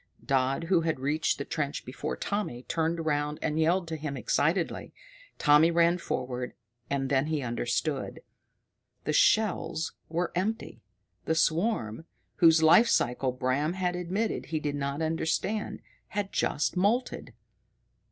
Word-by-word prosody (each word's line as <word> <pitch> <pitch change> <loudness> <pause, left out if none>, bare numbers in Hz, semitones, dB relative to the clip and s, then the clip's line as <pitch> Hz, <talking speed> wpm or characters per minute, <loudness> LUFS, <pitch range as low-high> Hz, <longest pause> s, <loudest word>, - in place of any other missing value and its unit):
Dodd, 135 +3 +1
who 170 0 +2
had 160 -4 -1
reached 150 +4 0
the 140 - -4
trench 145 -2 -3
before 125 - -4
Tommy, 200 -12 -3
turned 165 +2 -1
round 150 0 0
and 155 0 0
yelled 170 +3 +2
to 160 - -3
him 150 -3 -4
excitedly. 160 +7 0 0.4
Tommy 150 +2 +5
ran 170 +1 +3
forward 125 -4 -4 0.3
and 140 -1 -1
then 135 +1 +1
he 155 -3 -1
understood. 125 +4 -2 0.8
The - - -1
shells 210 - +2 0.2
were 170 +2 -1
empty. 205 +5 -3 0.4
The 160 - +1
swarm, 165 - 0 0.3
whose 160 -1 +6
life 170 +9 +7
cycle 125 - +1
Bram 130 +5 0
had 180 -1 -1
admitted 185 +5 -2
he 160 -1 -2
did 150 -1 -2
not 140 +2 -2
understand, 165 +6 -1 0.3
had 200 -1 -3
just 145 - 0
moulted! 215 +7 0
160 Hz, 135 wpm, -28 LUFS, 140-175 Hz, 0.8 s, life